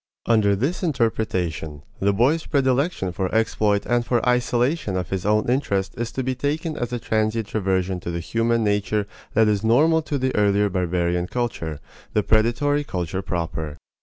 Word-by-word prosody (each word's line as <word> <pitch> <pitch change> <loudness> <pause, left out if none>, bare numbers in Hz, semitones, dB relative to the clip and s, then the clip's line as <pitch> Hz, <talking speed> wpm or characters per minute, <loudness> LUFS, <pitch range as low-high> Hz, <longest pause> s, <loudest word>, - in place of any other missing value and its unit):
Under 105 -3 +3
this 135 - -1
interpretation, 90 - -1 0.2
the 100 +1 +2
boy's 135 +11 +2
predilection 135 - +1
for 95 +1 -2
exploit 110 -2 +1
and 120 0 +1
for 120 0 0
isolation 125 - +1
of 90 - -3
his 95 0 -2
own 105 0 +2
interest 105 -6 0
is 120 0 -3
to 130 - -2
be 130 +1 -1
taken 150 +4 -2
as 120 -4 -3
a 120 - -1
transient 110 -1 -1
reversion 95 -3 0
to 85 - -6
the 85 0 -2
human 115 +6 0
nature 105 0 0 0.3
that 110 0 +5
is 105 -1 +1
normal 155 +9 +4
to 150 -2 -3
the 130 -1 -1
early 105 0 +3
barbarian 90 -1 0
culture 85 -12 -3 0.3
the 105 - +2
predatory 120 +8 +2
culture 90 - -3
proper. 80 -5 -4
110 Hz, 165 wpm, -23 LUFS, 95-125 Hz, 0.3 s, that